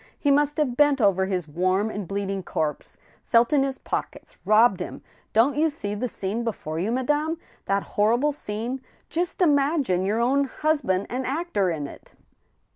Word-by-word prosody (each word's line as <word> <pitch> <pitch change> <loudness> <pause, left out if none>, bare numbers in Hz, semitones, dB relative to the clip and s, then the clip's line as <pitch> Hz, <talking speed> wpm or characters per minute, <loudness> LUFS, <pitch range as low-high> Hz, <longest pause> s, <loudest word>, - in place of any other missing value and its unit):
He 285 - +2
must 295 +1 +2
have 280 -6 +1
bent 290 0 +4
over 190 -3 +3
his 180 -4 -2
warm 185 +7 0
and 205 -4 -5
bleeding 195 0 -2
corpse, 155 -4 -3 0.3
felt 235 +4 +3
in 285 - +4
his 270 -1 -1
pockets, - - -5
robbed 215 -2 +5
him.... 180 - -6 0.3
Don't 245 +6 +3
you 315 +2 +3
see 205 -9 -4
the 210 +5 -2
scene 215 +1 -3
before 160 -9 -4
you, 200 +6 -1
madame 295 +6 0
— - - -31
that 195 0 +1
hor 215 +3 +2
rible 295 +3 +1
scene? 240 +1 -4 0.3
Just 345 +4 0
imagine 285 - +2
your 205 +4 0
own 270 +4 +2
husband 275 -10 0
an 255 +2 -2
actor 270 - 0
in 155 -4 -3
it - - -12
235 Hz, 180 wpm, -25 LUFS, 195-285 Hz, 0.3 s, robbed